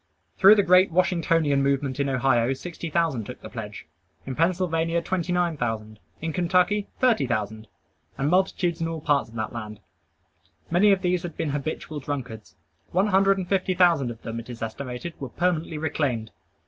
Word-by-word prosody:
Through 200 +2 +8
the 205 - +3
great 185 +1 +5
Washingtonian 165 -4 +2
movement 140 -1 0
in 140 -1 +1
Ohio, 130 -1 +2
sixty 165 +4 -7
thousand 155 -9 0
took - - -8
the - - -10
pledge. - - -7 0.4
In 130 - -4
Pennsylvania, 165 0 +1
twenty 180 +1 -2
nine 175 -3 +1
thousand. 110 -3 -3 0.2
In 165 0 -3
Kentucky, 180 +4 +2
thirty 245 -4 +3
thousand, 110 -1 -3 0.5
and 135 - 0
multitudes 175 -1 +1
in 165 - 0
all 165 -1 -4
parts 145 -5 +1
of 115 - -15
the 110 - -2
land. 105 -3 -7 0.9
Many 195 +5 +5
of 195 -1 +2
these 180 -1 +1
had 175 -3 -7
been 150 - -1
habitual 150 +1 -4
drunkards. 130 -6 -6 0.4
One 190 +4 +2
hundred 195 0 +4
and 185 -2 -4
fifty 185 -1 0
thousand 170 -8 +4
of 115 -1 -9
them, 115 +1 -4
it 115 - -10
is 115 -2 -6
estimated, 125 +7 -5
were 135 - -5
permanently 170 0 -1
reclaimed. 145 -8 -2
160 Hz, 175 wpm, -25 LUFS, 130-180 Hz, 0.9 s, Through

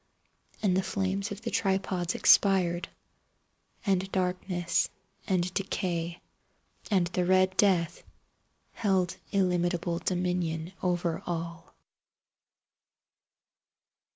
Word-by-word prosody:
And 190 -3 +3
the 190 - +3
flames 195 +1 -1
of 205 +2 -7
the 230 - -3
tripods 190 -3 0
expired. 180 -3 +4 1.0
And 190 -1 +1
Darkness 180 -1 0 0.4
and 185 -1 0
Decay 175 -3 -2 0.7
and 190 -5 +3
the 180 +1 -1
Red 185 +1 +3
Death 180 -4 +2 0.7
held 190 -4 0
illimitable 175 -3 +1
dominion 180 -2 -1
over 175 -2 0
all. 170 -1 -5
180 Hz, 85 wpm, -29 LUFS, 175-190 Hz, 1.0 s, expired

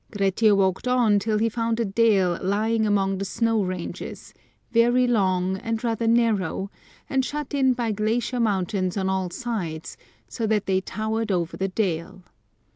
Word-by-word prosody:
Grettir 205 +1 +2
walked 190 +3 +1
on 240 -5 +3
till 215 +1 0
he 225 +2 +2
found 230 0 -1
a 230 - +1
dale 195 -4 +2
lying 215 +3 +1
among 195 -2 +1
the - - -2
snow 225 +2 0
ranges, 185 -2 -6 0.4
very 240 +2 +4
long, 190 -5 +1
and 225 +3 -3
rather 230 -1 -1
narrow, 210 -5 +1 0.4
and 265 -1 +1
shut 295 +2 -4
in 265 -2 +3
by 240 -2 -1
glacier 225 +4 -1
mountains 195 -3 0
on 190 -1 0
all 190 -1 -1
sides, 175 -8 -5 0.3
so 225 -3 -3
that 210 -2 +1
they 190 -1 +1
towered 220 +2 -2
over 170 -3 -1
the 190 - -1
dale. 185 -2 -2
215 Hz, 160 wpm, -24 LUFS, 190-230 Hz, 0.4 s, very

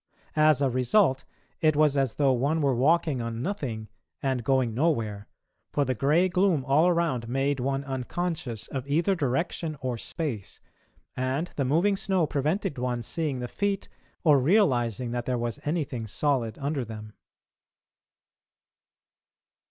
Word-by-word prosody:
As 155 -2 +5
a 135 - +3
result, 130 - +2 0.3
it 155 -2 +3
was 150 -1 +4
as 135 -5 +1
though 140 -2 +3
one 140 +6 +1
were 140 -3 +2
walking 145 +1 +2
on 115 0 -4
nothing 130 - -3 0.3
and 130 -3 -1
going 130 -2 +2
nowhere, 115 -8 0 0.4
for 145 - +1
the 130 - 0
grey 150 +9 +3
gloom 180 -6 +2
all 145 +5 +4
around 165 -9 +1
made 135 +2 0
one 135 +2 -1
unconscious 135 - -3
of 135 -1 -5
either 165 +7 +2
direction 155 +1 -1
or 125 -4 -3
space, 130 - -5 0.6
and 130 +7 -2
the 140 - 0
moving 170 +10 +3
snow 190 -3 +1
prevented 150 +2 -1
one 125 -1 -2
seeing 145 -2 -2
the 125 - -3
feet 200 +7 -2 0.3
or 150 -5 +6
realising 125 - +2
that 120 -1 -3
there 125 -1 0
was 120 -1 -3
anything 145 -7 -2
solid 120 -1 0
under 140 -1 -2
them. 110 -2 -9
135 Hz, 145 wpm, -27 LUFS, 125-160 Hz, 0.6 s, or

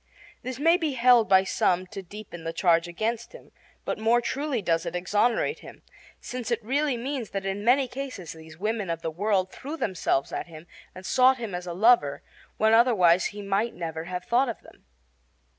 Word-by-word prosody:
This 255 -1 -5
may 330 +5 +4
be 315 -5 -2
held 240 -4 +4
by 190 -1 +6
some 185 -1 +1
to 195 - -5
deepen 190 -2 -10
the 165 0 -4
charge 170 -2 +2
against 225 - -3
him; - - -14 0.3
but - - -3
more 225 +2 +3
truly 275 +2 -2
does 165 -4 0
it 170 0 -5
exonerate 210 - +1
him, - - -13 0.4
since 250 -1 -6
it 235 - +1
really 280 +1 0
means 255 -2 -4
that 195 -1 -4
in 195 +1 -3
many 255 +3 +3
cases 255 - -7
these 160 -1 -13
women 210 0 -2
of 165 0 -3
the 160 - -2
world 190 +1 0
threw 290 +4 -7
themselves 175 - -1
at - - -4
him 160 -1 -12 0.3
and 185 +1 -10
sought 260 +3 +4
him 230 -5 -6
as 180 0 -5
a 175 - -4
lover, 205 -7 +3 0.3
when 220 +1 +3
otherwise 200 -7 +5
he 205 0 -5
might 200 +4 -1
never 160 -2 -5
have 180 0 -5
thought 245 +2 +2
of 230 - -5
them. - - -19
210 Hz, 195 wpm, -26 LUFS, 180-245 Hz, 0.4 s, by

